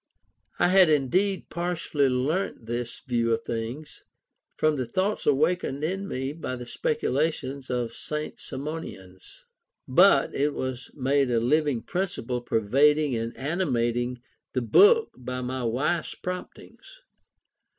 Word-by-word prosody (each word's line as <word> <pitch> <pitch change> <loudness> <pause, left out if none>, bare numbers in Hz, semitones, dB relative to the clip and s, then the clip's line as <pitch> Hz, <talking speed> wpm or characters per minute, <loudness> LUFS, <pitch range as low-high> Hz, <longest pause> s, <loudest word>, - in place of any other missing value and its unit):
I - - +3
had 185 -2 +6
indeed 180 +7 +1
partially 170 -5 0
learnt 130 +3 -1
this 120 0 -4
view 115 -2 0
of 115 0 -1
things 120 +7 -5 0.6
from 155 -1 +2
the 130 - -1
thoughts 190 - -1
awakened 150 0 +1
in 190 +5 -2
me 135 -1 -3
by 150 -5 -5
the 125 -1 -7
speculations 145 - -1
of 125 -2 -1
the - - -18
St. 150 +4 -5
Simonians; 130 - -8 0.4
but 170 +1 +5
it 145 +1 0
was 130 -1 -4
made 135 0 +1
a 120 -1 +2
living 145 0 +1
principle 175 -10 -3
pervading 140 +6 +3
and 115 0 -4
animating 125 -6 -1 0.3
the 130 - 0
book 435 - +5
by 125 0 -5
my 130 0 -3
wife's 145 +9 -1
promptings. 180 - -8
135 Hz, 130 wpm, -26 LUFS, 125-165 Hz, 0.6 s, had